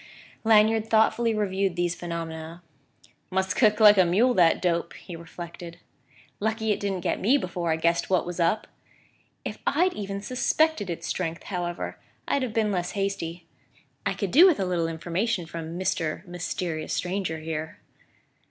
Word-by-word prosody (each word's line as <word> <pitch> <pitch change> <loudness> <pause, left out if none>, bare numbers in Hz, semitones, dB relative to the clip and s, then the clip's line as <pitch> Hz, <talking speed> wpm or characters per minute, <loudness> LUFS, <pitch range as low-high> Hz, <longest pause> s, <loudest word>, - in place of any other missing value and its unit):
Lanyard 220 0 +4
thoughtfully 230 +1 +3
reviewed 195 -3 0
these 175 -1 0
phenomena. 165 -1 -6 0.7
"Must 190 0 0
kick 215 -3 +4
like 210 -2 +8
a - - +8
mule, 210 +9 +3
that 170 -6 +4
dope!" 170 -1 0
he 175 - -9
reflected. 170 0 -9 0.6
"Lucky 220 +1 0
it 205 - 0
didn't 195 -3 -2
get - - -1
me 245 +9 +4
before 175 -7 -2
I - - +3
guessed 170 +1 +1
what 185 -2 +2
was 175 0 -6
up! 170 +6 +2 0.8
If - - -5
I'd 355 +6 +3
even 200 -1 -4
suspected 255 - +1
its 170 0 -4
strength, 165 -1 -3
however, 175 -2 -4 0.3
I'd 280 - +1
have 255 -3 -2
been 215 -1 +1
less 180 -2 -2
hasty: 195 -4 -3 0.6
I - - -1
could 200 -4 -3
do 345 +7 +8
with 350 - +3
a 190 - +1
little 175 -2 0
information 175 +5 -2
from 165 0 -6
Mr. 165 -4 -2
Mysterious 175 -2 -4
Stranger 180 -3 -2
here!" 155 0 -5
180 Hz, 160 wpm, -26 LUFS, 170-210 Hz, 0.8 s, like